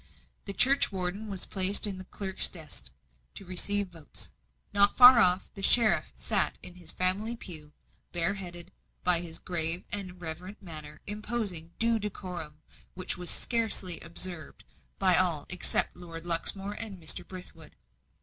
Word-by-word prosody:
The 200 - -4
churchwarden 205 -6 +2
was 195 -3 -3
placed 195 +2 +3
in 195 -3 -2
the 185 - -9
clerk's 190 0 +2
desk 155 - -7 0.5
to 195 - -9
receive 195 +2 0
votes. 165 -4 -8 0.4
Not 200 0 +4
far 250 -1 +10
off, 185 -2 +3
the 195 - -8
sheriff 220 +2 +4
sat - - 0
in 180 - -9
his 180 -1 -2
family 200 +6 0
pew, 155 -9 -10 0.4
bare 175 +2 +1
headed; 175 -2 -8 0.3
by 180 -2 +3
his 165 -2 -6
grave 170 0 +2
and 185 -3 -5
reverent 180 +4 -7
manner 155 -4 -10
imposing 205 -6 -4
due 230 0 +1
decorum, 180 -7 -7 0.3
which 185 0 -3
was 180 -1 -1
carefully 220 -7 +1
observed 170 -1 -7 0.3
by 185 -2 +5
all 170 -6 +2
except 180 0 +2
Lord 170 -1 -9
Luxmore 195 +4 +2
and 210 -4 -6
Mr. 160 -2 -3
Brithwood. 180 -4 -11
185 Hz, 145 wpm, -29 LUFS, 170-200 Hz, 0.5 s, far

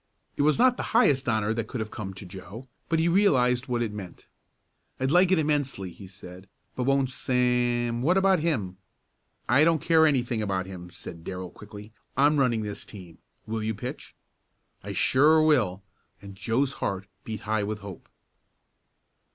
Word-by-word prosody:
It - - -1
was 150 +1 +3
not 250 +1 +4
the - - -3 0.2
highest 135 - +3
honor 110 -1 +1
that 115 -1 -3
could 125 - -5
have 110 -1 -4
come 95 -3 -6
to 95 - -10
Joe, 100 +7 -10 0.2
but 165 - +2
he 160 +1 +2
realized 130 -10 +3
what 120 -2 0
it 110 -3 -4
meant. 95 -4 -9 0.7
"I'd 130 +1 0
like 180 +2 +4
it 190 - +4
immensely," 145 - -1
he 95 +2 -12
said, 95 0 -13 0.3
"but 125 - -2
won't 135 -1 +2
Sam 125 -2 0
what 175 +8 +3
about 190 -2 +4
him?" 115 - -2 0.7
"I 135 +5 +5
don't 165 0 +3
care 160 0 +4
anything 125 -5 0
about 95 -3 -1
him," 90 -2 -9
said 85 -1 -9
Darrell 90 0 -6
quickly. 105 0 -12 0.2
"I'm 145 +2 +4
running 120 -5 +2
this 105 -1 -6
team. 90 -6 -12 0.3
Will 110 0 -3
you 110 0 -2
pitch?" 100 - -7 0.7
"I - - -5
sure 150 +5 +4
will!" 110 -12 +2 0.4
and 100 -1 -11
Joe's 120 +7 -1
heart 95 -1 -2 0.2
beat 110 -2 -6
high 110 0 -1
with 105 +1 -4
hope. 100 -3 -10
120 Hz, 175 wpm, -26 LUFS, 100-145 Hz, 0.7 s, I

